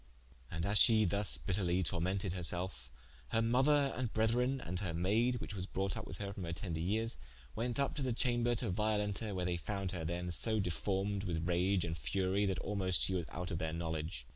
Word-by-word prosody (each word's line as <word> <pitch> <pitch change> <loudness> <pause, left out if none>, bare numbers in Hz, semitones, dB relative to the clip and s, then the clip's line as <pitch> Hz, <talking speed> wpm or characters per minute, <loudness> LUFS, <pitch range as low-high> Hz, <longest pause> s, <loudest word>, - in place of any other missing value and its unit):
And 80 +1 -2
as 100 +1 +3
she 110 -2 +6
thus 100 +3 +2
bitterly 90 -1 0
tormented 90 +3 0
her 90 - -4
selfe, 90 +2 -2 0.4
her 110 - +2
mother 135 +4 +3
and 125 -3 -2
brethren, 120 +4 +2
and 90 -6 -4
her 90 -5 -3
maide, 110 +8 +2
whiche 115 - -5
was 95 -2 -4
brought 95 0 -1
vp 110 0 -5
with - - -7
her 100 -1 -4
from 100 - -6
her 85 - -3
tender 85 -1 -4
yeres, 110 +7 0 0.4
went 120 +1 -1
vp 140 0 +1
to - - -1
the 130 -2 0
chamber 120 0 +2
to 105 - -2
Violenta, 105 +1 0
where 90 -1 -1
they 90 -1 0
found 95 +1 -3
her 90 -3 -4
then 85 +2 -2
so 110 +5 +3
deformed 95 +2 -1
with 85 -2 -1
rage 90 +1 +2
and 80 -1 -2
furie, 95 +10 +1
that 95 -2 0
almoste 95 -4 +1
she 95 - 0
was 85 -4 -1
out 90 +2 -5
of 85 - -2
their 80 -2 -2
knowledge. 80 -6 -3
95 Hz, 215 wpm, -35 LUFS, 85-110 Hz, 0.4 s, she